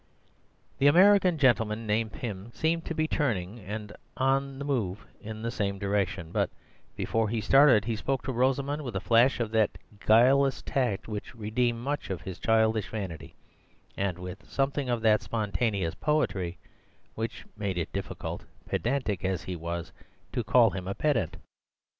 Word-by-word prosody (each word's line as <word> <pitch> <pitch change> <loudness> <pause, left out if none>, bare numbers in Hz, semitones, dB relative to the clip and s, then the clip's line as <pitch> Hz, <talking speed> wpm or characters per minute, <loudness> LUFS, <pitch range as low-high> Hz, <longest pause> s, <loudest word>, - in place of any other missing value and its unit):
The 140 - +5
American 185 +2 +6
gentleman 115 -5 +2
named 110 +1 0
Pym 115 -6 -6
seemed 165 +1 0
to 165 - -4
be 155 0 +1
turning 115 - -1
and 105 +1 -6 0.2
on 135 +1 +1
the 140 - -5
move 110 -9 -2 0.2
in 110 +1 -7
the 115 - -1
same 100 -5 -2
direction; 95 -4 -1
but - - +1 0.5
before 115 -1 0
he 115 +1 -1
started 130 -1 +5
he 115 -1 -1
spoke 135 +4 -2
to 130 - -3
Rosamund 135 +4 +1
with 125 -7 -6
a - - +1
flash 120 +6 +4
of 115 -2 -1
that 110 -2 +2 0.2
guileless 130 +5 +4
tact 120 -8 -1
which 105 0 -6
redeemed 115 +2 0
much 145 0 -3
of 95 -3 -3
his 95 -2 -7
childish 110 -1 +2
vanity, 95 -8 -6 0.6
and 95 -3 -1
with 90 0 -8
something 135 -1 -1
of 120 -2 -1
that 110 -1 +4
spontaneous 100 -3 -1
poetry 95 - 0 0.6
which 115 +1 -5
made 100 -4 -3
it 85 -2 -3
difficult, 100 -2 -5 0.2
pedantic 120 -6 -1
as 95 -2 -1
he 90 - -4
was, 85 0 -5 0.4
to 120 - -1
call 115 0 +5
him 90 0 -5
a 100 - -3
pedant. 120 - 0
110 Hz, 160 wpm, -28 LUFS, 100-135 Hz, 0.6 s, American